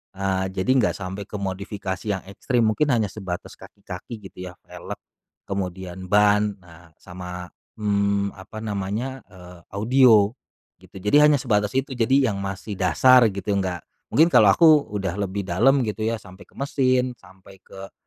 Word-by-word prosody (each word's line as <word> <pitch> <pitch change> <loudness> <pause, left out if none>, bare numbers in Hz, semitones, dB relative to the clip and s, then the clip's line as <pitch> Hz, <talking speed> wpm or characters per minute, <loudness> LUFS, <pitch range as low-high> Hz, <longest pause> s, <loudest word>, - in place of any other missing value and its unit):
Eee, 95 -1 -1
jadi 95 +7 0
nggak - - +1
sampai 100 +1 -6
ke - - -9
modifikasi 100 0 -5
yang 95 -2 -2
ekstrim. 115 +5 -1
Mungkin 110 +8 +2
hanya 105 -4 0
sebatas 95 -4 -7
kaki-kaki, 110 -3 -10
gitu 90 0 -8
ya, 90 - -9
velg, - - -8 0.5
kemudian 95 -1 -5
ban, 105 +1 +3
ah 85 -1 -18
sama, 90 -1 -9 0.2
mmm, 100 -2 0
apa 110 +3 -9
namanya, 105 +6 -3
eee, 90 -2 -14 0.2
audio, 110 -1 +5 0.5
gitu. - - -20
Jadi 105 +9 +3
hanya 150 - +4
sebatas 105 -5 0
itu, 135 +1 -1
jadi 130 0 +2
yang 100 - -4
masih 100 +1 -6
dasar, 120 +7 +5
gitu, 100 +1 -4
nggak 95 -4 -2 0.2
mungkin 165 +3 +3
kalau - - +6
aku 155 -4 +5
udah 95 -3 -2 0.2
lebih 100 +1 -4
dalam, 120 +9 +3
gitu 110 0 -2
ya, 115 - 0
sampai 95 -3 -13
ke - - -28
mesin, 130 -2 +1
sampai 95 0 -18
ke 95 0 -12
100 Hz, 160 wpm, -23 LUFS, 95-115 Hz, 0.5 s, kalau